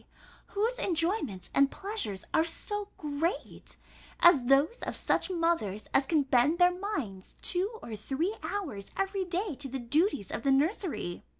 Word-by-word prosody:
whose 455 +5 +1
enjoyments 330 - -1
and 275 0 +5
pleasures 385 - -4
are 320 - +5
so 410 +5 -3
great, 310 +8 -3 0.4
as 330 -8 +6
those 280 - +4
of - - -3
such - - 0
mothers 330 - 0
as 270 0 +4
can 310 -2 +3
bend 270 +4 +3
their 355 0 +5
minds 290 - -4
two 390 +5 -1
or 225 - -5
three 275 - -1
hours 315 - -4
every 390 0 0
day 365 +1 -2
to 275 +1 -4
the 270 - -3
duties 265 - +1
of - - -3
the 275 - +2
nursery? 295 - 0
320 Hz, 155 wpm, -30 LUFS, 270-385 Hz, 0.4 s, as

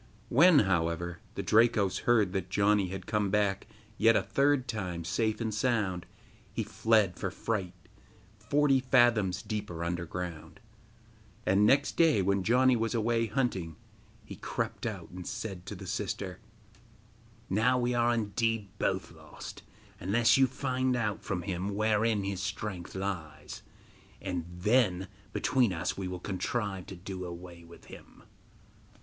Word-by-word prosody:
When, 165 +5 +6
however, 85 -1 -1 0.2
the - - -3
Drakos 110 -3 +3
heard 110 -6 +4
that 95 -2 -2
Janni 100 -1 +2
had 95 -1 -6
come 105 -2 0
back 100 -1 0 0.3
yet 115 +1 +5
a - - +3
third 140 -2 +2
time 90 -6 -4
safe 110 +4 0
and 110 -2 -2
sound, 105 -6 0 0.4
he - - -2
fled 110 -5 +2
for - - -1
fright 95 -5 -3 0.6
forty 135 +5 +3
fathoms 120 -8 +3
deeper 105 -6 -4
underground; 85 -1 -5 0.9
and, 100 +3 +4
next 140 +4 +3
day, 155 - +4
when 100 +1 +1
Janni 125 +5 +4
was 115 +1 -1
away 115 0 +1
hunting, 95 - -1 0.5
he - - -9
crept - - -3
out - - -6
and 90 0 -8
said 95 -5 -5
to - - -5
the - - -9
sister: - - -4 1.1
'Now 115 +6 +2
are - - 0
we 120 0 +1
indeed 115 -2 0
both - - -1
lost, - - -10 0.4
unless 110 +6 +3
you 135 0 +5
find 130 0 -1
out 105 -4 -2
from 90 -3 -3
him 95 +2 -3
wherein 110 0 +2
his 95 -1 -3
strength 95 -2 -5
lies, 95 -5 -5 0.6
and 90 -4 -3
then 95 0 +1 0.2
between 125 -6 +2
us 85 -2 -2
we 95 -1 -4
will 90 -1 -5
contrive 95 0 -3
to 95 - -8
do 95 +1 -6
away 85 -1 -9
with 85 0 -15
him. - - -14
100 Hz, 145 wpm, -30 LUFS, 90-115 Hz, 1.1 s, When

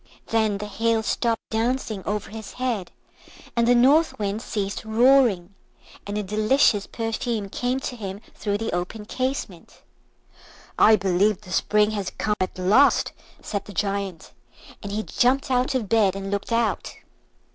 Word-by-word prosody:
Then 220 -2 +1
the 210 - -5
Hail 225 +2 0
stopped 230 0 -1
dancing 225 -2 -1
over 210 +1 -3
his 220 -1 -8
head, 245 -7 -2 0.7
and 235 -1 +2
the 245 - +5
North 285 +7 +4
Wind 205 +1 -2
ceased 200 -4 -3
roaring, 220 -5 +3 0.5
and 205 +1 -3
a 210 - -1
delicious 215 +1 +2
perfume 225 -2 -3
came 250 +5 -1
to 250 - -4
him 200 -3 -6
through 205 -1 -2
the 225 +1 -3
open 180 +5 -4
casement. 255 -8 -4 1.0
"I 220 - +7
believe 195 +1 +1
the 185 -3 -12
Spring 210 +2 +2
has 200 -3 -3
come 210 - 0
at 185 - -2
last," 205 +10 +4 0.3
said 200 -2 -4
the 205 - -10
Giant; 195 -2 -3 0.5
and 200 - -6
he 215 +1 -2
jumped 260 +4 +1
out 255 +1 +1
of 235 -5 -1
bed 205 -3 +3
and 195 0 -5
looked 200 +2 -3
out. 230 -1 0
215 Hz, 155 wpm, -24 LUFS, 200-235 Hz, 1.0 s, I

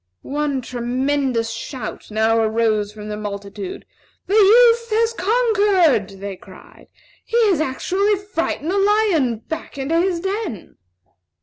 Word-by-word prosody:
One 285 -1 -2
tremendous 250 0 -1
shout 230 +1 -7
now 220 +1 +2
arose 220 -2 +1
from 210 0 -10
the 210 - -3
multitude. 200 -1 -6 0.4
"The 390 - -3
youth 465 +3 +5
has 455 +1 +1
conquered!" 390 - +2
they 200 0 -5
cried. - - -16 0.4
"He 465 - -2
has 320 -5 +1
actually 375 +9 0
frightened 365 -5 -3
the 400 - +1
lion 395 - +2
back 320 -2 -6
into 290 +5 0
his 360 -2 0
den!" 385 - -4
290 Hz, 125 wpm, -20 LUFS, -, 0.4 s, youth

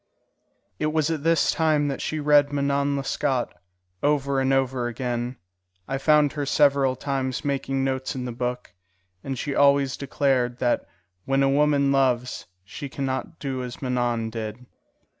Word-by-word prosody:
It 155 - +1
was 155 0 +1
at 160 -3 -2
this 165 0 +3
time 155 -2 +2
that 135 - -4
she 155 - -2
read 145 -1 +4
Manon 140 0 0
Lescaut, 135 -2 -1 0.5
over 140 -2 +1
and 135 0 +1
over 130 -2 +1
again. 120 0 -3 0.5
I 135 - -2
found 150 0 +4
her 145 -1 -2
several 140 -2 +3
times 135 -1 -3
making 135 -1 -1
notes 130 +1 -2
in 125 -1 -4
the 125 - -4
book, 125 +1 -4 0.5
and 135 -1 -4
she 145 +3 -3
always 140 -1 +3
declared 130 -3 0
that 120 -1 0 0.4
when 135 0 +2
a 135 - +3
woman 140 -1 +3
loves, 125 -2 +1 0.2
she 140 +8 -7
can 135 +1 -4
not 130 +6 -3
do 135 -2 -4
as 125 -1 -7
Manon 120 -3 -1
did. 110 +2 -6
135 Hz, 160 wpm, -24 LUFS, 125-145 Hz, 0.5 s, read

